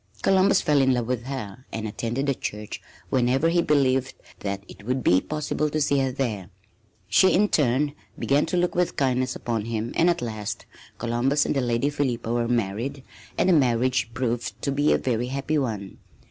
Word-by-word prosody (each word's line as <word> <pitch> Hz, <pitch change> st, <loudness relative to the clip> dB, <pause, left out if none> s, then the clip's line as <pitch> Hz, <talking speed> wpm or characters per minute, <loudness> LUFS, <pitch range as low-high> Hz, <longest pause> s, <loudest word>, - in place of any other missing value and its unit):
Columbus 195 Hz, +1 st, +4 dB
fell 145 Hz, -2 st, +3 dB
in 130 Hz, -1 st, +3 dB
love 120 Hz, -1 st, -1 dB
with 125 Hz, -1 st, -2 dB
her 130 Hz, -3 st, -6 dB
and 110 Hz, -1 st, -3 dB
attended 120 Hz, +5 st, -2 dB
the 140 Hz, -, +2 dB
church 105 Hz, -4 st, -6 dB, 0.3 s
whenever 130 Hz, +5 st, +2 dB
he 170 Hz, +1 st, +3 dB
believed 135 Hz, -4 st, +2 dB, 0.2 s
that 100 Hz, -1 st, -4 dB
it -, -, -13 dB
would 125 Hz, +3 st, -1 dB
be 90 Hz, +1 st, +4 dB
possible 150 Hz, 0 st, -2 dB
to 155 Hz, -, -1 dB
see 140 Hz, -1 st, +2 dB
her 135 Hz, -1 st, +1 dB
there. 110 Hz, -8 st, -3 dB, 0.6 s
She, 190 Hz, -, +5 dB
in 205 Hz, +3 st, +3 dB
turn, 140 Hz, +1 st, +2 dB, 0.2 s
began 145 Hz, +3 st, +2 dB
to 180 Hz, -, -1 dB
look 175 Hz, 0 st, +1 dB
with 180 Hz, 0 st, 0 dB
kindness 130 Hz, -1 st, 0 dB
upon 115 Hz, -3 st, -2 dB
him 115 Hz, 0 st, -3 dB
and 170 Hz, -, +4 dB
at 170 Hz, -8 st, 0 dB
last 110 Hz, -3 st, -4 dB, 0.3 s
Columbus 120 Hz, +5 st, +1 dB
and -, -, -1 dB
the 135 Hz, -, +2 dB
Lady 120 Hz, +3 st, 0 dB
Philippa 125 Hz, -5 st, -1 dB
were 120 Hz, -1 st, 0 dB
married 120 Hz, +4 st, -2 dB, 0.3 s
and -, -, +2 dB
the 185 Hz, -, +5 dB
marriage 125 Hz, -4 st, +2 dB
proved 120 Hz, -2 st, -2 dB
to 140 Hz, -, 0 dB
be 145 Hz, +2 st, +2 dB
a -, -, +4 dB
very 120 Hz, -1 st, -1 dB
happy 140 Hz, +4 st, -1 dB
one. 105 Hz, -7 st, -4 dB
130 Hz, 190 wpm, -25 LUFS, 115-145 Hz, 0.6 s, She